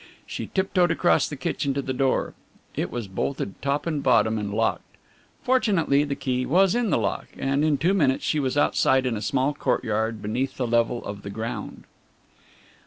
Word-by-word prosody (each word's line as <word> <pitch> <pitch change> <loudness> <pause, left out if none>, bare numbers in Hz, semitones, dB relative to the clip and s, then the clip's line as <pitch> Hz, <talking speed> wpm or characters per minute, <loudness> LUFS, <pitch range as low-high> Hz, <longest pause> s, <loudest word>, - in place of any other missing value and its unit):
She - - -5
tiptoed 190 -2 +1
across 170 +1 +2
the 150 - -5
kitchen 135 0 -2
to 140 - 0
the 130 - -3
door. 135 0 0 0.4
It - - -2
was 120 -4 -5
bolted 95 +1 -4
top 140 +1 -1
and 155 -4 -1
bottom 110 -4 +3
and 100 -1 -3
locked. 115 +2 -2 0.5
Fortunately 195 - +2
the 145 -1 -2
key 130 -2 -1
was 185 +7 +3
in 240 -2 +1
the - - +2
lock, 100 -5 -2
and 135 +2 0
in 155 -2 +2
two 170 +8 +2
minutes 140 -9 +2
she 155 - +1
was 135 0 -1
outside 130 -2 +3
in 125 -3 0
a 105 - -4
small 135 +4 0
courtyard 110 -3 -1
beneath 120 +6 -2
the 130 - -1
level 120 0 +1
of 100 0 -6
the 100 - -7
ground. 110 +3 -5
135 Hz, 185 wpm, -25 LUFS, 115-150 Hz, 0.5 s, bottom